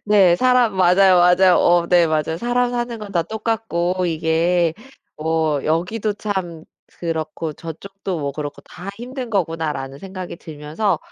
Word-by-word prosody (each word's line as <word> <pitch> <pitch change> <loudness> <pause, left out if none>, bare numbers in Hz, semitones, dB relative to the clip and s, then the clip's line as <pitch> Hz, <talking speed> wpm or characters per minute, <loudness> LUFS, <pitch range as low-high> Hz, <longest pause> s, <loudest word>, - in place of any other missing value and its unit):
네, 195 -4 +5
사람 250 -2 +3
맞아요. 185 +1 +5
맞아요. 180 +1 +5
어 175 0 +4
네 175 -2 +5
맞아요. 155 0 -1
'사람 245 +2 +1
사는 240 -1 -3
건 210 -2 -8
다 170 -3 +2
똑같고 185 -3 -1
이게 165 +1 +1 0.4
뭐 155 -2 0
여기도 180 +7 0
참 190 -6 -4 0.3
그렇고 160 -1 -3
저쪽도 185 +4 -6
뭐 140 -1 -2
그렇고 145 0 -6
다 180 +4 -11
힘든 250 +1 -6
거구나.'라는 160 -8 -2
생각이 185 0 -7
들면서 160 +5 -2
175 Hz, 290 characters per minute, -20 LUFS, 160-205 Hz, 0.4 s, 네